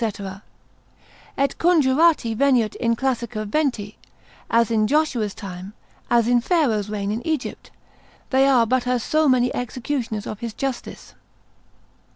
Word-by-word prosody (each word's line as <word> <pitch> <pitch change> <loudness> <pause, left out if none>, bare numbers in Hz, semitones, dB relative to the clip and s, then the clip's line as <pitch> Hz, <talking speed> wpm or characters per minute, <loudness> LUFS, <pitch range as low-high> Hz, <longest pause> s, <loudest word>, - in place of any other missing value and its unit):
Et 275 0 +1
conjurati 310 -6 +3
veniunt 250 -4 +2
in 230 -1 +1
classica 235 -3 -2
venti: 220 -5 -1 0.5
as 230 -1 +2
in 215 -1 +2
Joshua's 260 -8 0
time, 190 -1 -8 0.4
as 235 -1 +3
in 240 0 +3
Pharaoh's 235 - +1
reign 205 -1 -3
in 220 +3 -3
Egypt; 310 -5 -3 0.6
they 265 +1 +4
are 250 -4 +4
but 250 +1 0
as 250 -2 0
so 310 -1 +2
many 250 -1 +2
executioners 245 -3 -3
of 215 - -6
his 230 -2 -6
justice. 270 -3 -5
245 Hz, 130 wpm, -22 LUFS, 215-275 Hz, 0.6 s, they